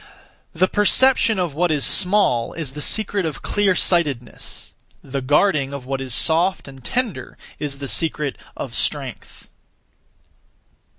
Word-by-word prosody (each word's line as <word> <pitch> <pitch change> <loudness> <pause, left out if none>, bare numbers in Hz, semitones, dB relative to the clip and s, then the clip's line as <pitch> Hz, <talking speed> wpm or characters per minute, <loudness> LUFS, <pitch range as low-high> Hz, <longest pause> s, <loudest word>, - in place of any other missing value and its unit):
The 185 +3 +2
perception 220 +3 +3
of 175 -5 -1
what 175 +4 +1
is 150 -3 +1
small 180 - +2
is 155 -6 -4
(the 150 +2 -6
secret 205 +2 +2
of) 160 -4 -4
clear 200 -3 +1
sightedness; 145 -11 -1 0.3
the 135 0 -4
guarding 140 0 +2
of 135 -3 -8
what 135 0 -3
is 130 -1 -5
soft 165 +9 +3
and 135 -2 -12
tender 245 - -3 0.2
is 145 -2 -4
(the 140 0 -5
secret 150 -2 0 0.2
of) - - -6
strength. - - -4
155 Hz, 135 wpm, -21 LUFS, 135-190 Hz, 0.3 s, perception